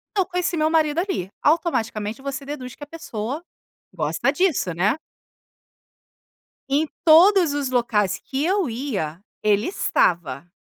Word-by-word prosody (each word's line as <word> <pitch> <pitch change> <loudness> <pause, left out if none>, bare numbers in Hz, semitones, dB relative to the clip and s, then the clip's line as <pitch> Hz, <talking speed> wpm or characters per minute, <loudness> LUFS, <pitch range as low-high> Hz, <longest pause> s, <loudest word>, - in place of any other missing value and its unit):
Então 385 -2 +3
conheci 360 -2 -2
meu 310 0 +2
marido, 315 -1 +2
ali, 355 - -2
automaticamente 230 - 0
você 275 0 -5
deduz 265 -4 -7
que - - -11
a 290 - -8
pessoa 285 -2 -5 0.5
gosta 165 - 0
disso, 305 - +1
né? 195 - +1 1.7
E 275 - +1
em 315 - -6 0.2
todos 340 0 +6
os 285 -2 -1
locais 230 -6 +1
que 275 +2 -3
eu 375 -4 +1
ia 215 - -3 0.2
ele 210 +1 +2
estava. 170 - 0
275 Hz, 135 wpm, -23 LUFS, 210-325 Hz, 1.7 s, todos